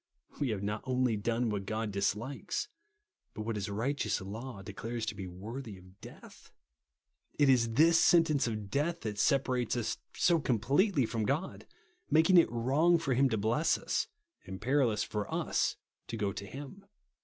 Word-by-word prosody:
We 140 Hz, -, 0 dB
have 105 Hz, -3 st, -2 dB
not 105 Hz, +1 st, -2 dB
only 125 Hz, -3 st, +1 dB
done 115 Hz, +2 st, 0 dB
what 100 Hz, -2 st, -3 dB
God 110 Hz, -1 st, -2 dB
dislikes, 105 Hz, +7 st, -2 dB, 0.7 s
but 110 Hz, -, -4 dB
what 115 Hz, 0 st, -3 dB
his 105 Hz, 0 st, -3 dB
righteous 125 Hz, +8 st, -1 dB
law 105 Hz, +2 st, -7 dB
declares 110 Hz, +4 st, -5 dB
to 110 Hz, -, -3 dB
be 100 Hz, -2 st, -7 dB
worthy 105 Hz, +5 st, -7 dB
of 95 Hz, +2 st, -18 dB
death. -, -, -13 dB, 0.9 s
It 145 Hz, -2 st, +4 dB
is 115 Hz, -3 st, +3 dB
this 165 Hz, +6 st, +5 dB
sentence 165 Hz, -7 st, +4 dB
of 105 Hz, -3 st, -4 dB
death 165 Hz, +5 st, 0 dB
that 105 Hz, -2 st, -4 dB
separates 125 Hz, -3 st, +1 dB
us 115 Hz, -2 st, -2 dB, 0.2 s
so 170 Hz, -2 st, +4 dB
completely 135 Hz, -, +2 dB
from 110 Hz, 0 st, -2 dB
God, 155 Hz, -, -2 dB, 0.4 s
mak 160 Hz, +3 st, +4 dB
aig 180 Hz, -, +8 dB
it 165 Hz, -, +4 dB
wrong 140 Hz, +9 st, +3 dB
for 150 Hz, -5 st, -1 dB
him 135 Hz, +2 st, +3 dB
to 110 Hz, -, 0 dB
bless 115 Hz, +10 st, +2 dB
us, -, -, -1 dB, 0.4 s
and 95 Hz, 0 st, -6 dB
peril 135 Hz, 0 st, +2 dB
ous 105 Hz, -1 st, -1 dB
for 105 Hz, -2 st, -4 dB
us -, -, 0 dB, 0.3 s
to 115 Hz, -, -5 dB
go 100 Hz, -2 st, -1 dB
to 100 Hz, -, -7 dB
him. 145 Hz, -, -9 dB
115 Hz, 175 wpm, -31 LUFS, 105-140 Hz, 0.9 s, aig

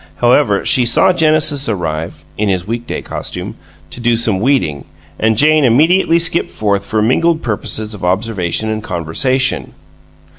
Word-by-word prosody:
However, 120 Hz, -, +2 dB
she 125 Hz, -, +4 dB
saw 185 Hz, +10 st, +4 dB
Genesis 155 Hz, -5 st, +1 dB
arrive 80 Hz, -4 st, -4 dB
(in 105 Hz, +2 st, -1 dB
his 90 Hz, -2 st, -1 dB
weekday 115 Hz, +3 st, -5 dB
costume) -, -, -5 dB, 0.4 s
to -, -, -6 dB
do 120 Hz, 0 st, +1 dB
some 110 Hz, -4 st, 0 dB
weeding, 95 Hz, -, 0 dB, 0.3 s
and 110 Hz, -1 st, +1 dB
Jane 155 Hz, +3 st, +4 dB
immediately 165 Hz, +8 st, +3 dB
skip 170 Hz, 0 st, +1 dB
forth 100 Hz, -2 st, -1 dB
for 110 Hz, +1 st, -1 dB
mingled 160 Hz, +8 st, +1 dB
purposes 110 Hz, -1 st, -2 dB
of 105 Hz, -, -9 dB
observation 95 Hz, +1 st, -1 dB
and 110 Hz, 0 st, -3 dB
conversation. 130 Hz, -, -1 dB
115 Hz, 145 wpm, -14 LUFS, 100-140 Hz, 0.4 s, she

